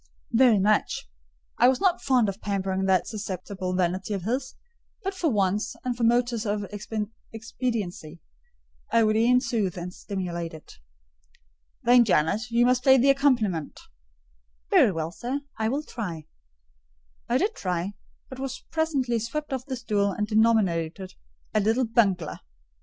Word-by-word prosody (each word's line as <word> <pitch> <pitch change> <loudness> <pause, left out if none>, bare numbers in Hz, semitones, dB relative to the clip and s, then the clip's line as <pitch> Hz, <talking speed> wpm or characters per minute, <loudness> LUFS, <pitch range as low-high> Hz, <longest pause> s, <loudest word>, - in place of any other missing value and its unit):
"Very 240 -2 +5
much." 205 - +1 0.5
I 245 - +7
was 260 0 +3
not 370 -2 +2
fond 255 -5 +3
of 200 +1 -4
pampering 190 -1 -1
that 185 -2 +3
susceptible 185 -3 -4
vanity 185 +3 -1
of 190 - -5
his; 255 +5 -2 0.5
but 390 0 -2
for 360 -4 0
once, 205 -2 0
and 250 -1 -1
from 235 -1 +2
motives 240 -1 +1
of 205 -2 -2 0.7
expediency, 220 -8 -4 0.7
I 230 0 +4
would 215 0 +2
e'en 245 +3 +4
soothe 225 -8 -1
and 180 +1 -6
stimulate 175 -5 -5
it. 155 - -14 1.0
"Then, 245 0 +6
Jane, 170 -6 +2
you 235 +1 +3
must 250 0 +3
play 265 +1 +6
the 270 +2 +5
accompaniment." 235 - +1 0.9
"Very - - +6
well, 165 -2 -3
sir, 250 +9 -4 0.2
I 220 0 +1
will 280 +5 -1
try." 180 - -6 1.0
I 240 - +3
did 410 +9 0
try, 180 - -3 0.3
but 260 - -10
was 265 -1 -5
presently 280 -7 0
swept 275 +6 -4
off 260 0 -4
the 265 - -3
stool 205 -5 0
and 210 - -1
denominated 195 -5 +1 0.4
"a 215 - +3
little 225 +5 +2
bungler." 195 -8 +1
220 Hz, 145 wpm, -26 LUFS, 190-250 Hz, 1.0 s, I